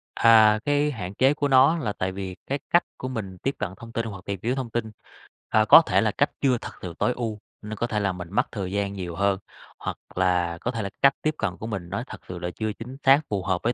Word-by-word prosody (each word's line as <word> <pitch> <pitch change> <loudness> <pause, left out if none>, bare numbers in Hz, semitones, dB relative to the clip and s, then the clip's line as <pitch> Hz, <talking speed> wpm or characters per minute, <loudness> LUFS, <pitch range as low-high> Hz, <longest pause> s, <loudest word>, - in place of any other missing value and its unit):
À, 110 -2 +6
cái 145 +1 +2
hạn 95 -8 -6
chế 130 +6 +4
của 145 -1 -1
nó 135 +4 +5
là 110 -10 -2
tại 95 -1 -2
vì 95 -1 -6
cái 140 +2 -1
cách 175 - +4
của 130 - -5
mình 105 -7 -5
tiếp 135 +9 -2
cận 105 - -1
thông 115 +2 -11
tin 115 0 -2
hoặc 100 -4 -8
tìm 100 -2 -4
hiểu 120 +3 0
thông 130 -3 -4
tin, 110 -1 -3 0.6
ờ, 110 0 +4
có 135 - +10
thể - - +2
là 110 -1 +2
cách 145 - +1
chưa 130 -3 +3
thật - - -6
sự 90 -2 -6
tối 125 - +2
ưu, 110 -3 -3 0.2
nên 110 0 -6
có 120 - -2
thể 105 -3 -1
là 100 -2 +1
mình 90 -1 -7
mất - - +1
thời 95 -4 -4
gian 100 0 -1
nhiều 90 -4 -5
hơn. 100 +1 +1 0.4
Hoặc - - -4 0.2
là 90 -2 +1
có 125 - -1
thể 115 -3 -3
là 100 - -3
cách 140 0 +6
tiếp 155 -1 0
cận 95 -4 -2
của 110 - -6
mình 95 -6 -5
nó 100 +5 -3
thật - - -8
sự 90 -1 -6
là 90 0 -3
chưa 110 -1 -2
chính 125 +5 -9
xác, 135 +1 +7
phù 100 -3 -1
hợp 90 0 0
với 120 - +1
110 Hz, 270 wpm, -25 LUFS, 95-125 Hz, 0.6 s, có